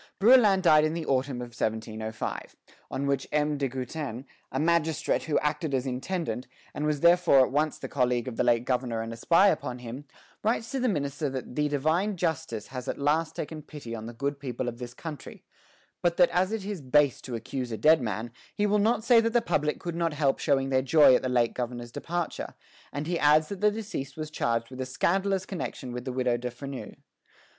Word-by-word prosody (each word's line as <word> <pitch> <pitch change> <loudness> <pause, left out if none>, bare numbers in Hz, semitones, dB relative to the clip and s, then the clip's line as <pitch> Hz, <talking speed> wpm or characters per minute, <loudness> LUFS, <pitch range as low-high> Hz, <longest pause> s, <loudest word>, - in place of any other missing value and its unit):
Brouillan 210 -3 +6
died 155 -3 +6
in 155 +1 0
the 165 -2 -3
autumn 130 -2 0
of 120 - -8
1705, 110 -1 -4 0.3
on 140 - -3
which 140 -1 0
M. 150 -1 +1
de 140 - +1
Goutin, 130 0 -5 0.3
a 130 - -2
magistrate 165 0 +1
who 155 - +1
acted 150 -1 -1
as 130 0 -1
intendant, 130 -1 -3 0.3
and 150 - -2
was 150 -2 0
therefore 170 -5 +6
at - - -7
once 150 +2 +1
the - - -6
colleague 125 -2 0
of 125 - -4
the - - +1
late 120 -1 +2
governor 125 -3 -1
and 115 0 -6
a - - -6
spy 170 - +4
upon 125 -9 -2
him, 125 +3 -8 0.4
writes 225 +1 0
to 270 - -1
the 255 -1 +1
minister 145 -4 -1
that 130 -2 -6
"the 150 0 +1
divine 160 +8 0
justice 160 -9 -2
has 125 0 -6
at - - -2
last 155 +3 +1
taken 155 0 -5
pity 145 -6 -9
on 110 -1 -6
the 120 - -7
good 140 +4 -3
people 125 -3 -4
of 120 0 -5
this 125 -1 -7
country," 155 0 -8 0.6
but 170 -1 +1
that 175 - +5
as 185 +3 +1
it 220 -3 -3
is 200 -5 -4
base 140 0 +3
to 125 - -5
accuse 125 +2 -4
a 110 - -3
dead 155 +7 +5
man, 110 0 -3 0.2
he 205 - +1
will 210 0 +2
not 220 +1 +2
say 235 -1 +6
that 230 0 -1
the 240 - +5
public 150 -10 0
could 170 - -4
not 170 -2 0
help 140 -2 +1
showing 135 -3 +1
their 130 -1 +3
joy 135 +1 +6
at - - +4
the 130 - -2
late 120 -2 +2
governor's 120 -1 -5
departure; 170 +5 -4 0.4
and 145 +1 -4
he 170 +1 -1
adds 155 +1 +4
that 200 -2 -6
the 210 - +5
deceased 205 -11 -5
was 155 -1 -5
charged 115 -4 -1
with 130 0 -6
a - - -2
scandalous 190 +8 0
connection 135 -8 -5
with 125 +1 -6
the 130 - -2
Widow 125 -1 +1
de 125 +1 -4
Freneuse. 135 +2 -8
145 Hz, 220 wpm, -28 LUFS, 125-170 Hz, 0.6 s, Brouillan